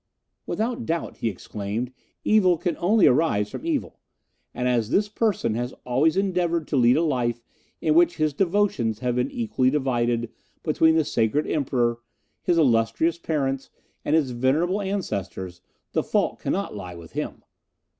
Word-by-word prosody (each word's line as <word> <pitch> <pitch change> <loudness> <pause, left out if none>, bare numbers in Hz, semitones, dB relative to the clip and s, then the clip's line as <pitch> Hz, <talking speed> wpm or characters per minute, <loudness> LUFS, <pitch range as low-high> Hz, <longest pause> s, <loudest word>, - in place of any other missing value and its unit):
"Without 230 +2 -2
doubt," 165 +1 -2
he 115 - -1
exclaimed, 105 +4 -4 0.3
"evil 185 -5 +4
can 175 - -1
only 205 +4 +4
arise 125 -7 +3
from 330 - -6
evil, 310 -4 -2 0.5
and 125 - -2
as 120 -3 +1
this 205 +9 +2
person 210 - 0
has 120 +2 -3
always 140 +8 +2
endeavoured 175 -4 0
to - - -2
lead 125 +1 +5
a 165 - +2
life 120 -6 -1 0.4
in 155 - +2
which 170 +2 +4
his 155 -2 +1
devotions 170 - +1
have 125 -1 0
been 125 - +1
equally 220 - 0
divided 120 -4 0 0.3
between 160 0 +3
the 160 -2 +3
sacred 115 +4 +1
Emperor, 120 -5 0 0.4
his 175 - +1
illustrious 130 +4 +2
parents, 135 -5 -2 0.3
and 150 - +1
his 145 -5 +2
venerable 150 +11 +1
ancestors, 100 - -4 0.3
the - - +1
fault - - 0
cannot - - -2
lie 90 -1 -7
with 85 -2 -12
him. - - -5
140 Hz, 155 wpm, -24 LUFS, 120-170 Hz, 0.5 s, lead